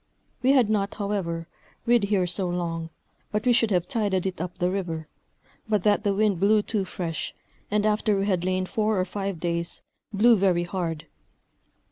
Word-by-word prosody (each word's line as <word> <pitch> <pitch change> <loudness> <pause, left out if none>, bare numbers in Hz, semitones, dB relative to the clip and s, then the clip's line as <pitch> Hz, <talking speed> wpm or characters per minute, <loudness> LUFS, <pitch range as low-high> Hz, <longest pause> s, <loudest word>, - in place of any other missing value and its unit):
We 265 +2 +4
had 255 -5 +5
not, 205 -2 0
however, 190 -5 -2 0.4
rid 235 -3 +4
here 200 -3 +2
so 180 +1 -1
long, 165 -2 -3 0.4
but 210 +2 -1
we 245 - +5
should 230 -2 +3
have 180 -4 +1
tided 205 -7 0
it 185 -3 -3
up 180 0 -5
the 180 +1 +1
river, 165 -5 -3 0.6
but 210 -4 +2
that 210 0 +3
the 200 -2 +1
wind 205 -3 +2
blew 210 +2 +4
too 205 -3 -1
fresh, 170 -4 -4 0.3
and 210 0 +1
after 210 -1 +2
we 195 - 0
had 185 -4 +1
lain 185 0 0
four 215 +1 0
or 185 - +1
five 195 -2 -4
days, 170 0 -2 0.3
blew 225 +3 +5
very 185 -3 +2
hard. 170 -3 -3
195 Hz, 180 wpm, -26 LUFS, 175-210 Hz, 0.6 s, had